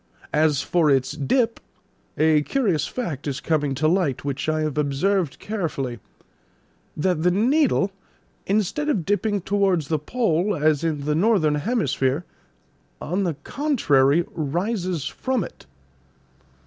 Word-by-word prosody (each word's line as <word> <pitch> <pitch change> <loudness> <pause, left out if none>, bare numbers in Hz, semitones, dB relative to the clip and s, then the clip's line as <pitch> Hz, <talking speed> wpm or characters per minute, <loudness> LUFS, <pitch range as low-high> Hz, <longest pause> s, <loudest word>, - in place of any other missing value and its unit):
As 150 -2 +2
for 170 -4 +2
its 135 -2 +2
dip, 230 - 0 0.6
a 155 -1 +4
curious 195 - 0
fact 160 - -4
is 140 0 -2
coming 150 -4 0
to 155 +4 +1
light, 160 -7 0
which 140 +2 -2
I 155 0 0
have 155 -2 -2
observed 150 +3 0
carefully: 150 - -3 1.0
that 175 0 0
the 180 - +3
needle, 230 - +2 0.6
instead 215 +9 0
of 195 - 0
dipping 205 0 0
towards 190 -6 +1
the 155 -2 +1
pole 195 - 0
as 155 -1 +2
in 150 -4 -1
the 150 - +1
northern 170 -3 +3
hemisphere, 145 - 0 0.7
on 190 +4 -1
the 170 -4 -1
contrary, 170 - +2
rises 175 +1 -2
from 260 -5 -1
it." 65 - -11
165 Hz, 130 wpm, -23 LUFS, 150-205 Hz, 1.0 s, a